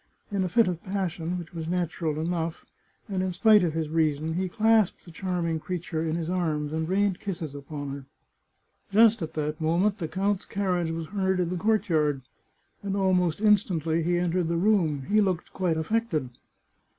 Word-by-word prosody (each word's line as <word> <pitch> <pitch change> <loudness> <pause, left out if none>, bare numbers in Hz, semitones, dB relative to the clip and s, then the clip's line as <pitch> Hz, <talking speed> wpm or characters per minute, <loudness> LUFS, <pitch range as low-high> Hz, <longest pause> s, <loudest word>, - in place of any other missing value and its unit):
In 200 -2 0
a 185 - -1
fit 230 +3 +4
of 175 -2 -3
passion, 180 -3 -2
which 175 -1 -8
was 165 -2 -5
natural 170 -3 -1
enough, 165 0 -2 0.4
and 190 -2 -2
in 185 0 -1
spite 210 +2 +5
of 165 -3 0
his 160 -1 -1
reason, 155 0 0
he 185 +2 -1
clasped 220 0 +2
the 170 - -12
charming 170 -2 -2
creature 165 -1 -3
in 160 -1 -1
his 165 -2 -3
arms 155 -4 -1
and 160 +1 -2
rained 195 0 +1
kisses 170 -7 -5
upon 145 0 -6
her. 140 -1 -7 0.8
Just 225 +1 +5
at 160 - -5
that 150 +1 -2
moment 180 +6 +1
the 165 - -2
count's 195 +3 -1
carriage 180 -4 0
was 165 0 -3
heard 190 +1 0
in 175 -2 0
the 180 - -2
courtyard, 160 -9 +1 0.6
and 200 -1 -2
almost 185 -2 +1
instantly 175 -6 +2
he 175 +2 +1
entered 175 0 0
the 170 0 0
room. 170 -7 +2
He 210 +9 +3
looked 185 -4 -1
quite 175 -4 0
aflFected. 160 - -1
175 Hz, 180 wpm, -27 LUFS, 160-195 Hz, 0.8 s, spite